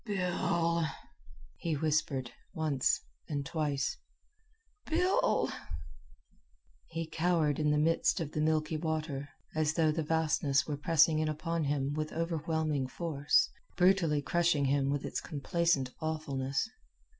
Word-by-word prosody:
"Bill!" 170 -4 0 0.7
he 165 -2 -1
whispered, 145 -4 0 0.2
once 150 -5 +1 0.3
and 145 -2 -2
twice; 145 -3 -1 0.9
"Bill!" 360 +4 +2 1.4
He 165 0 -4
cowered 160 -2 +1
in 150 -1 +2
the 150 - +3
midst 165 +5 +2
of 155 -3 -3
the 155 - -1
milky 155 0 +1
water, 155 -3 -3 0.2
as 155 0 +1
though 160 -2 +3
the 160 +1 -1
vastness 150 -3 +1
were 150 - -2
pressing 160 +1 +4
in 155 0 +1
upon 165 +1 -2
him 140 0 0
with 155 0 -3
overwhelming 160 -4 -1
force, 145 0 +1 0.3
brutally 180 -6 +3
crushing 170 -3 +2
him 135 0 +2
with 145 0 -1
its - - -3
complacent 155 -3 0
awfulness. 140 -1 -2
155 Hz, 120 wpm, -32 LUFS, 145-165 Hz, 1.4 s, pressing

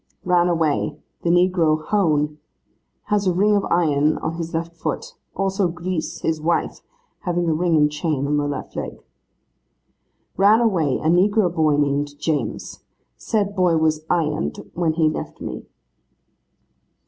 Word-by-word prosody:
'Ran 180 -1 +3
away, 155 -3 0 0.2
the 170 - -1
negro 170 -3 +2
Hown. 150 -7 +1 0.6
Has 205 -2 0
a - - +4
ring 205 +4 +3
of 200 - +1
iron 155 -3 +2
on 160 - -3
his 165 0 -5
left 165 0 -3
foot. 165 - -4 0.2
Also, 195 0 0
Grise, 175 -1 -4
his 160 -1 -1
wife, 170 +2 -1 0.4
having 175 -2 -1
a 160 - +2
ring 165 0 +2
and 150 0 +3
chain 150 -2 -1
on 150 +1 +1
the 145 0 0
left 145 -2 -5
leg.' - - -6 1.3
'Ran 205 +3 +5
away, 175 - +1
a - - -3
negro 185 +2 +3
boy 155 -3 +2
named 145 0 0
James. 155 0 -3 0.4
Said 205 -3 -1
boy 180 -3 +3
was 155 -1 +1
ironed 155 -2 -1
when 165 -2 0
he 160 -1 +2
left 155 - -4
me. - - -7
165 Hz, 150 wpm, -22 LUFS, 155-180 Hz, 1.3 s, Ran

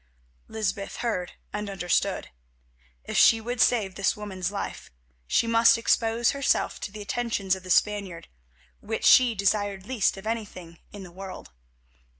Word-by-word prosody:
Lysbeth 200 -2 -3
heard 205 -7 -3 0.2
and 210 0 -4
understood. 180 -3 -1 0.7
If - - -4
she 225 - +6
would 240 +2 -3
save 210 -6 +2
this 195 +2 0
woman's 190 -3 -4
life 200 - -6 0.4
she 230 - +2
must 230 0 +5
expose 230 0 +1
herself 280 -1 0
to 205 - -6
the 210 0 -8
attentions 205 -4 -1
of 190 - -10
the 185 - -12
Spaniard, 200 -3 0 0.5
which - - -4
she 245 -3 +6
desired 200 -1 0
least 225 -5 0
of 195 - -10
anything 190 -7 -5
in 205 -2 -9
the 180 - -11
world. 190 +1 -9
205 Hz, 150 wpm, -26 LUFS, 190-230 Hz, 0.7 s, she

